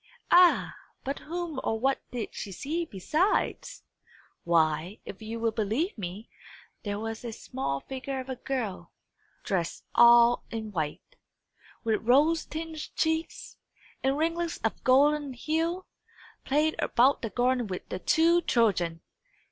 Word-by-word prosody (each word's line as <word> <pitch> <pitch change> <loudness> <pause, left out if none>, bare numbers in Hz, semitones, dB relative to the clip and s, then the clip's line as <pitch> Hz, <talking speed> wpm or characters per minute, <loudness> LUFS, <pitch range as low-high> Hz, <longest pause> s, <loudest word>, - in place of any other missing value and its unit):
Ah, 355 0 +6 0.3
but 275 +2 -3
whom 335 -3 -4
or 225 - -1
what 270 +3 +1
did 240 -3 -4
she 200 - -6
see 315 - -3
besides? 310 - -1 0.6
Why, 165 +3 +1
if 190 - -9
you 225 +1 -5
will 230 0 +1
believe 225 - -1
me, 200 +2 -6 0.5
there 205 -2 -3
was 225 +1 -5
a 235 - -4
small 215 - -4
figure 265 0 -5
of 260 - -7
a 260 - -4
girl, 245 -6 -4 0.5
dressed 175 -4 -2
all 235 0 +6
in 220 -2 -5
white, 160 - -4 0.7
with 220 -2 0
rose 295 +8 +3
tinged 320 0 -6
cheeks 320 0 -2 0.4
and 270 +1 +1
ringlets 335 +2 -1
of 225 - -2
golden 285 +2 +3
hue, 325 +7 -1 0.6
playing 305 +3 +2
about 260 +4 +3
the 225 - -3
garden 245 0 +1
with 185 -2 -6
the 185 - -4
two 335 - +3
children! 175 - +1
250 Hz, 135 wpm, -28 LUFS, 215-310 Hz, 0.7 s, Ah